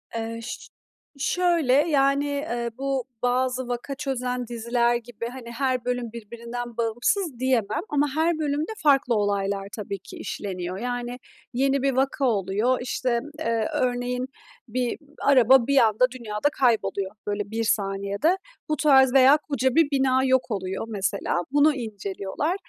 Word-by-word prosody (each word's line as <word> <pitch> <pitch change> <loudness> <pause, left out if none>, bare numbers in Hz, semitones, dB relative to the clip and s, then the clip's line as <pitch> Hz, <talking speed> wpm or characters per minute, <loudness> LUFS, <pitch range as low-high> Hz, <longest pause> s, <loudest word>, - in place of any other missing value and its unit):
Eee, 230 0 -4
şö 240 - -7 0.5
şöyle, 340 -3 +2
yani, 280 -1 +3
eee, 240 -5 -2
bu 270 -1 -1 0.2
bazı 255 0 0
vaka 245 +3 -4
çözen 250 -3 -3
diziler 235 +1 +1
gibi, 235 -1 -5
hani, 240 -1 -8
her 255 0 -1
bölüm 245 -2 -2
birbirinden 235 +1 -7
bağımsız 240 - 0
diyemem 245 -4 +1
ama 290 0 +2
her 320 +1 +1
bölümde 300 +4 -1
farklı 275 -5 +4
olaylar 200 -1 0
tabii 200 -2 -5
ki - - -12
işleniyor 185 -2 -5
yani 245 +2 -4 0.3
yeni 270 +2 +2
bir 275 +1 +2
vaka 270 +2 +1
oluyor. 215 +2 +1
İşte, 245 -1 -1 0.2
eee, 230 -6 0
örneğin 250 0 -1 0.4
bir 245 +1 -2 0.3
araba 260 -2 +6
bir 280 0 +2
anda 225 0 +5
dünyada 215 +4 -1
kayboluyor, 220 -6 +1 0.2
böyle, 205 0 -3
bir 225 +1 -1
saniyede. 200 - +1 0.3
Bu 305 - +2
tarz 265 -3 +5
veya 270 +2 +7
koca 280 -3 0
bir 325 -3 +4
bina 265 -1 +3
yok 260 -1 +2
oluyor 190 0 -3
mesela 195 -4 -1
bunu 295 +1 +4
inceliyorlar. 210 - -3
245 Hz, 140 wpm, -25 LUFS, 225-275 Hz, 0.5 s, veya